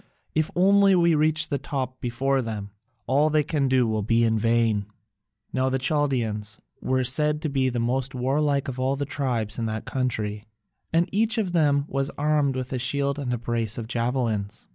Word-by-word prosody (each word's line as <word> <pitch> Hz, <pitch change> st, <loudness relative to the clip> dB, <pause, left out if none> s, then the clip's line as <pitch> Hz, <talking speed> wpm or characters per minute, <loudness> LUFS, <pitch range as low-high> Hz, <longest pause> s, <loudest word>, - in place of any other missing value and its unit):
If 155 Hz, 0 st, +1 dB
only 195 Hz, +1 st, +5 dB
we 170 Hz, -1 st, +4 dB
reach 155 Hz, +1 st, +2 dB
the 140 Hz, -, -1 dB
top 130 Hz, -3 st, -4 dB
before 135 Hz, +3 st, 0 dB
them, 105 Hz, -4 st, -5 dB, 0.3 s
all 145 Hz, +5 st, +3 dB
they 155 Hz, -1 st, +2 dB
can 145 Hz, -2 st, 0 dB
do 130 Hz, -1 st, +3 dB
will 110 Hz, -1 st, 0 dB
be 115 Hz, +3 st, +2 dB
in 110 Hz, -1 st, +2 dB
vain." 115 Hz, -2 st, +1 dB, 0.7 s
Now 130 Hz, 0 st, +1 dB
the 130 Hz, -, 0 dB
Chaldaeans 120 Hz, -7 st, -1 dB, 0.2 s
were 130 Hz, 0 st, +1 dB
said 150 Hz, +4 st, +1 dB
to 155 Hz, -, 0 dB
be 135 Hz, -2 st, +1 dB
the 120 Hz, -1 st, -2 dB
most 130 Hz, +3 st, -1 dB
warlike 140 Hz, +2 st, +1 dB
of 130 Hz, -1 st, -5 dB
all 130 Hz, +1 st, +1 dB
the 140 Hz, +1 st, -2 dB
tribes 125 Hz, -6 st, -2 dB
in 115 Hz, -, -1 dB
that 110 Hz, 0 st, -4 dB
country, 110 Hz, -5 st, -2 dB, 0.5 s
and 170 Hz, +2 st, +2 dB
each 220 Hz, +3 st, +1 dB
of 195 Hz, -5 st, -1 dB
them 145 Hz, -4 st, +3 dB
was 135 Hz, 0 st, -1 dB
armed 150 Hz, -2 st, +1 dB
with 130 Hz, 0 st, -4 dB
a 130 Hz, -, -1 dB
shield 140 Hz, +3 st, 0 dB
and 130 Hz, -3 st, -3 dB
a 120 Hz, -, 0 dB
brace 115 Hz, -2 st, -2 dB
of 115 Hz, -2 st, -5 dB
javelins. 115 Hz, -4 st, -2 dB
130 Hz, 190 wpm, -25 LUFS, 115-145 Hz, 0.7 s, only